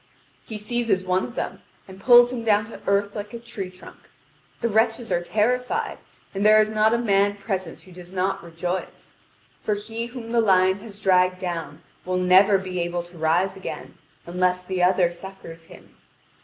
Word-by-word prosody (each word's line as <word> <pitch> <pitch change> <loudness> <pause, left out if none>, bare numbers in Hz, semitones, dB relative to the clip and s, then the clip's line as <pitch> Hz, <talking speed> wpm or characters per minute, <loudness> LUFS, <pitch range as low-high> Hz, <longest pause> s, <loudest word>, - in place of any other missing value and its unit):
He 220 - -6
seizes 215 -3 -1
one 185 0 +1
of 245 - -7
them, - - -4 0.3
and 190 0 -12
pulls 245 -1 +7
him 235 -2 -4
down 210 -2 +3
to 225 - -11
earth 200 0 +1
like 210 +2 -6
a - - -6
tree 230 -5 -6
trunk. 185 0 -15 0.5
The 235 - +1
wretches 225 +1 +1
are 175 - +1
terrified, 240 +7 -1 0.3
and 195 0 -2
there 215 +1 +7
is 215 0 +2
not 220 +1 +3
a - - +2
man 205 -3 +2
present 190 -4 -4
who 185 - -17
does 180 0 -12
not 190 +1 -1
rejoice. 175 +2 -5 0.5
For 210 - 0
he 225 +3 -5
whom 240 -2 -8
the 235 -1 +3
lion 190 -2 +3
has 205 -1 -12
dragged 185 -2 +3
down 165 -5 -5 0.2
will 185 0 -1
never 185 +2 +5
be 185 -2 -4
able 175 0 -2
to 175 0 -15
rise 175 +5 +1
again, 190 - -7 0.3
unless 180 +1 0
the 185 -1 -2
other 180 -1 +3
succours 170 -2 -11
him. - - -16
195 Hz, 185 wpm, -24 LUFS, 180-215 Hz, 0.5 s, pulls